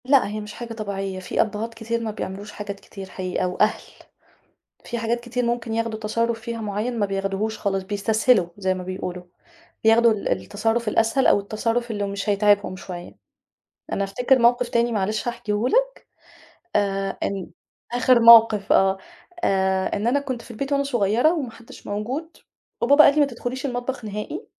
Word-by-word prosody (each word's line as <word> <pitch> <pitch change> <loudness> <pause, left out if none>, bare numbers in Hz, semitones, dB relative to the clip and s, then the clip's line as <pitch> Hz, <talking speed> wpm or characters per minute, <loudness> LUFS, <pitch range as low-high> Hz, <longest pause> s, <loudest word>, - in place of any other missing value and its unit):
لأ 270 -3 +4
هي 210 +1 -4
مش 210 0 -8
حاجة 235 -1 -7
طبيعية، 195 -3 -4
في 185 - 0
أبهات 220 +1 -3
كتير 230 +1 -3
ما 225 -1 -3
بيعملوش 205 0 -6
حاجات 200 -1 -7
كتير 195 -1 -10
حقيقة، 185 -1 -2
وأهل، 210 +4 +1 1.0
في 240 - -4
حاجات 230 +1 -1
كتير 245 +1 -3
ممكن 235 -1 -2
ياخدوا 230 -1 -2
تصرف 230 +2 -1
فيها 230 0 -5
معيّن 215 +3 -3
ما 205 - +2
بياخدوهوش 195 +2 -2
خالص، 195 -2 -1
بيستسهلوا 205 0 +2
زي 190 -2 0
ما 185 0 -6
بيقولوا، 180 -1 -5 0.6
بياخدوا 225 +1 +5
ال 210 - -4
التصرف 225 - -1
الأسهل 225 +5 +2
أو - - +5
التصرف 230 +4 -2
اللي 205 -2 -2
مش 200 +2 -3
هيتعبهم 205 -1 +2
شوية. 180 -2 -9 0.8
أنا 200 - 0
أفتكر 250 +7 +2
موقِف 240 0 +3
تاني 235 0 +1
معلش 215 +2 -1
هاحكيهُ 235 -1 -1
لك، - - +4 0.9
آآ، 195 -1 -1
إن 195 -2 -3 0.4
آخر 245 0 +4
موقِف، 230 -3 +7
آه، 190 0 +4 0.5
آآ، 190 -1 +1
إن 210 - -2
أنا 270 +4 +2
كنت 255 -4 -5
في - - -16
البيت 275 +5 -4
وأنا 280 0 +2
صغيرة 240 +3 +2
وما 280 -8 -3
حدش 230 +1 -14
موجود 255 +11 -4 0.4
وبابا 285 +5 +6
قال 280 - +6
لي 305 - +3
ما 290 - +5
تدخليش 255 +1 -5
المطبخ 245 -1 -4
نهائي 210 0 -5
220 Hz, 170 wpm, -23 LUFS, 200-240 Hz, 1.0 s, موقِف